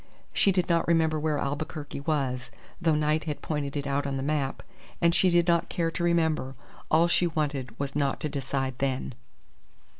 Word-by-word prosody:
She 200 - +4
did 180 -2 +1
not 170 -1 +2
remember 160 -2 +3
where 155 -1 0
Albuquerque 145 +1 -4
was, 135 -4 -1 0.3
though 165 -3 +3
Knight 155 +1 +1
had 150 -2 -4
pointed 145 -2 -2
it 140 - -3
out 140 0 0
on 135 -1 -2
the 135 - -3
map; 140 -2 -1 0.4
and 170 -1 +4
she 180 +2 +4
did 175 0 +3
not 170 -1 +2
care 165 -1 -1
to 170 - -3
remember. 160 -6 +1 0.3
All 165 +2 +5
she 175 0 +3
wanted 140 -7 -2
was 140 -1 -3
not 140 -2 0
to - - 0
decide 135 -2 -2
then. 135 -1 -1
150 Hz, 185 wpm, -28 LUFS, 140-165 Hz, 0.4 s, All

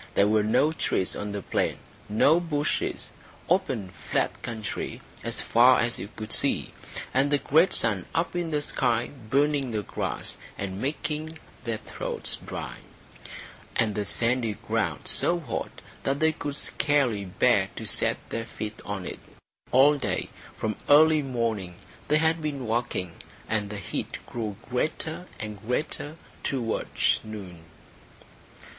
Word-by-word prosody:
There 100 - +5
were 110 0 +4
no 110 +8 +3
trees 95 - 0
on 105 0 -4
the 100 -2 -4
plain, - - 0 0.3
no 140 +10 +5
bushes; 150 -4 -1 0.4
open 135 - +1
flat 90 - -1
country 115 -3 -4 0.2
as - - -1
far 125 +2 +6
as 120 0 +1
you 100 - -5
could 110 0 -3
see, - - +3 0.4
and 135 +2 +3
the 145 - +4
great 160 +6 +4
sun 105 -6 +2
up 170 +2 0
in 175 -2 -1
the 150 -2 0
sky 120 -4 +1 0.2
burning 140 0 +2
the 110 -3 -2
grass - - -3 0.2
and 95 0 -4
making 155 +3 -2 0.3
their 115 -2 -1
throats - - -2
dry, - - -6 1.0
and 110 -2 +2
the 105 - -1
sandy 115 +3 +1
ground - - -2
so 175 0 +3
hot 140 -9 -5 0.2
that 135 +1 0
they 160 0 +4
could 145 -2 -5
scarcely 140 -9 +2
bear 90 - +3
to - - -5
set - - +4
their 115 0 -2
feet 110 -1 -6
on 100 -3 -4
it. - - -5 0.5
All 140 +3 +6
day - - -1 0.3
from 110 -2 -2
early 155 +1 +7
morning 115 -9 -2 0.3
they 150 - +4
had 160 +1 +2
been 140 -4 -3
walking, 115 -6 -1 0.4
and 105 -2 0
the 105 - -5
heat 100 - -4
grew 110 -4 -4
greater 155 +6 -2
and 105 -2 -6
greater 145 +5 -1 0.3
towards 120 -5 0
noon. 95 -6 -8
120 Hz, 145 wpm, -27 LUFS, 105-150 Hz, 1.0 s, early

